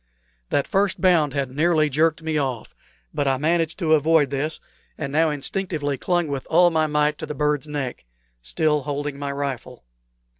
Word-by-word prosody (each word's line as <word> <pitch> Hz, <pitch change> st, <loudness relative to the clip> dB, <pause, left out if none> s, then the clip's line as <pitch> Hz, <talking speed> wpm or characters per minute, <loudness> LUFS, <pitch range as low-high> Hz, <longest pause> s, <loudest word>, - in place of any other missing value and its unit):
That 140 Hz, -, +1 dB
first 195 Hz, 0 st, +1 dB
bound 165 Hz, -7 st, +3 dB
had 135 Hz, -2 st, -1 dB
nearly 155 Hz, +2 st, +2 dB
jerked 160 Hz, +3 st, +1 dB
me 160 Hz, -1 st, -2 dB
off; 130 Hz, -5 st, -3 dB, 0.4 s
but 145 Hz, -, -1 dB
I 135 Hz, -1 st, +2 dB
managed 165 Hz, +3 st, 0 dB
to 160 Hz, -4 st, +2 dB
avoid 155 Hz, -2 st, +3 dB
this 145 Hz, +3 st, -2 dB, 0.4 s
and 140 Hz, -, -4 dB
now 160 Hz, +1 st, +3 dB
instinctively 150 Hz, 0 st, -2 dB
clung 175 Hz, +4 st, 0 dB
with 140 Hz, -2 st, -4 dB
all 175 Hz, +2 st, +5 dB
my 160 Hz, -1 st, +2 dB
might 150 Hz, 0 st, +1 dB
to -, -, -5 dB
the 150 Hz, -, -5 dB
bird's 150 Hz, +1 st, 0 dB
neck, 135 Hz, -, -4 dB, 0.4 s
still 150 Hz, -, +1 dB
holding 145 Hz, 0 st, -4 dB
my 140 Hz, -1 st, -3 dB
rifle. 135 Hz, -, -5 dB
150 Hz, 175 wpm, -23 LUFS, 140-160 Hz, 0.4 s, all